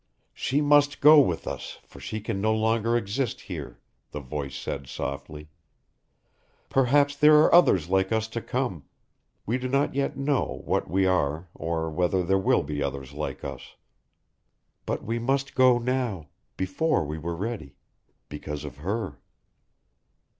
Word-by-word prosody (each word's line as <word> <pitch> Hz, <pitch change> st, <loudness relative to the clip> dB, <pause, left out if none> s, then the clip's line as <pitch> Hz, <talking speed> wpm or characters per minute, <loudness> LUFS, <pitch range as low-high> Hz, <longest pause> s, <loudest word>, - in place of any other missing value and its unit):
"She 140 Hz, +3 st, 0 dB
must 145 Hz, -1 st, +4 dB
go 150 Hz, +1 st, +8 dB
with 90 Hz, -, +1 dB
us -, -, -6 dB
for -, -, -15 dB
she 110 Hz, -, -5 dB
can 105 Hz, -2 st, -3 dB
no 110 Hz, +1 st, +2 dB
longer 115 Hz, +1 st, +1 dB
exist 120 Hz, +3 st, -2 dB
here," 70 Hz, -9 st, -8 dB, 0.3 s
the 75 Hz, -, -6 dB
voice 70 Hz, 0 st, -5 dB
said 70 Hz, -1 st, -5 dB
softly. 75 Hz, +3 st, -6 dB, 1.2 s
"Perhaps 140 Hz, +2 st, +3 dB
there 150 Hz, +1 st, +6 dB
are 150 Hz, -, +5 dB
others 95 Hz, -, +5 dB
like 95 Hz, +1 st, +1 dB
us 110 Hz, 0 st, 0 dB
to 115 Hz, +1 st, -4 dB
come 120 Hz, -, -3 dB, 0.6 s
we 120 Hz, +4 st, -1 dB
do 130 Hz, -, -3 dB
not 140 Hz, +2 st, +1 dB
yet 140 Hz, +1 st, -1 dB
know 140 Hz, -1 st, -1 dB
what -, -, -1 dB
we 95 Hz, +3 st, +2 dB
are 85 Hz, -2 st, 0 dB
or 80 Hz, -1 st, -3 dB
whether 90 Hz, +3 st, +1 dB
there 95 Hz, +2 st, +2 dB
will 95 Hz, -, +2 dB
be 75 Hz, 0 st, -4 dB
others 70 Hz, -1 st, -4 dB
like 70 Hz, -2 st, -5 dB
us. 65 Hz, -3 st, -8 dB, 1.1 s
But -, -, -2 dB
we 115 Hz, +2 st, -2 dB
must 135 Hz, +3 st, -1 dB
go 130 Hz, -1 st, +5 dB
now, 120 Hz, -, -2 dB, 0.3 s
before 95 Hz, -, 0 dB
we 75 Hz, +2 st, -5 dB
were 85 Hz, +2 st, -4 dB
ready, 100 Hz, -, -5 dB, 0.5 s
because 75 Hz, 0 st, -6 dB
of 70 Hz, -2 st, -8 dB
her." 95 Hz, -2 st, -4 dB
95 Hz, 155 wpm, -26 LUFS, -, 1.2 s, go